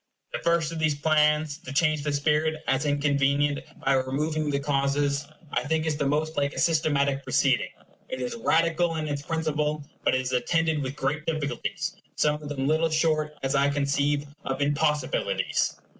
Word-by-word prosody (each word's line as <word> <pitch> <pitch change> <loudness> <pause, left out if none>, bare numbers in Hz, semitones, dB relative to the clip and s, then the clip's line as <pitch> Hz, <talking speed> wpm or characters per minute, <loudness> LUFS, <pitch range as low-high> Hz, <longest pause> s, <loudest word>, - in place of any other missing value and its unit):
The - - -2
first 170 -2 +1
of 165 - -5
these 155 -2 +2
plans 150 0 +2
to 170 -6 -9
change 155 +1 +2
the 150 +1 -1
spirit, 150 +2 +1
as 135 +3 +1
inconvenient, 145 0 +2 0.3
by 135 - +4
removing 150 +4 0
the 140 -1 0
causes 140 0 0 0.2
I - - 0
think 160 +1 0
is 155 -2 0
the 145 -2 0
most 155 +3 -1
like 140 0 0
a - - -3
systematic 145 -4 +2
proceeding. - - +2 0.4
It - - -4
is 245 - -3
radical 170 -5 +1
in 155 -1 -2
its 145 -1 -2
principle; 150 -1 -1 0.2
but - - +3
it 130 - +1
is 130 0 -4
attended 160 +5 +1
with 135 0 -4
great 150 +2 -2
difficulties, 155 -3 -2 0.2
some 150 0 +1
of 145 - -7
them 135 -2 -2
little 160 +2 +2
short, 155 -1 +1
as 135 +1 0
I 140 0 +3
conceive, 145 0 +1 0.2
of 135 - -3
impossibilities. 150 - 0
150 Hz, 175 wpm, -26 LUFS, 140-155 Hz, 0.4 s, by